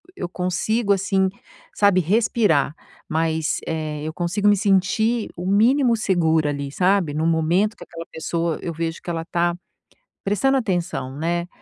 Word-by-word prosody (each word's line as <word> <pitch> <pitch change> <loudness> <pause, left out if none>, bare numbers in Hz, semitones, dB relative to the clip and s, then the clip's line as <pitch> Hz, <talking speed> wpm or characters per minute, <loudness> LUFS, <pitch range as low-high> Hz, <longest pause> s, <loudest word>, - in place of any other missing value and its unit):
eu 180 - -5
consigo 195 +5 -1
assim, 195 -1 +1 0.4
sabe, 200 -3 +4
respirar, 200 - +2 0.4
mas 160 0 0
eh, 155 -2 -3
eu 155 +1 -4
consigo 180 +5 -1
me 205 - +5
sentir 210 +4 +1
o 175 - -5
mínimo 235 +6 +3
segura 160 -7 +2
ali, 140 -1 -4
sabe, 185 -3 +2
no 155 +2 -1
momento 170 +7 +2
que - - -10
aquela 165 0 -9
pessoa, 165 0 -2
eu 170 - -4
vejo 165 +1 -4
que - - -8
ela 165 -1 -2
está 175 +1 0 0.7
prestando 210 +8 +2
atenção, 175 - -2
né, 170 +2 -1
175 Hz, 150 wpm, -22 LUFS, 160-200 Hz, 0.7 s, me